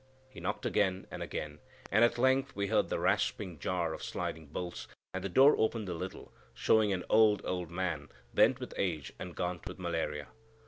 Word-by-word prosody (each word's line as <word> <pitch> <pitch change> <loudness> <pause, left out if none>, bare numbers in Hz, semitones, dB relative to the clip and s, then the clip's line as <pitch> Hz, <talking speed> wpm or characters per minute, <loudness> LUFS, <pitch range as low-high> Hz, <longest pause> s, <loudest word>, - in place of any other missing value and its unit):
He 130 - -12
knocked - - -3
again 95 -2 +1
and - - -6
again, - - -5 0.3
and 110 +4 +5
at 120 0 +4
length 130 +2 +2
we 100 - 0
heard 110 +2 +2
the - - 0
rasping 85 -5 0
jar 85 0 -1
of - - -7
sliding 80 -1 -4
bolts, 85 +4 -5 0.3
and 95 0 -3
the 100 - -2
door 135 +10 +7
opened 110 -2 0
a - - -1
little, 90 +3 -7 0.2
showing 110 -2 +3
an 90 -2 -1
old, 110 -2 +5
old 90 -2 -2
man, 85 -4 -2 0.2
bent - - +5
with - - -6
age 80 -9 -2
and 90 -2 -7
gaunt 90 -1 -3
with 90 - -7
malaria. 80 -5 -2
95 Hz, 190 wpm, -32 LUFS, 85-110 Hz, 0.3 s, door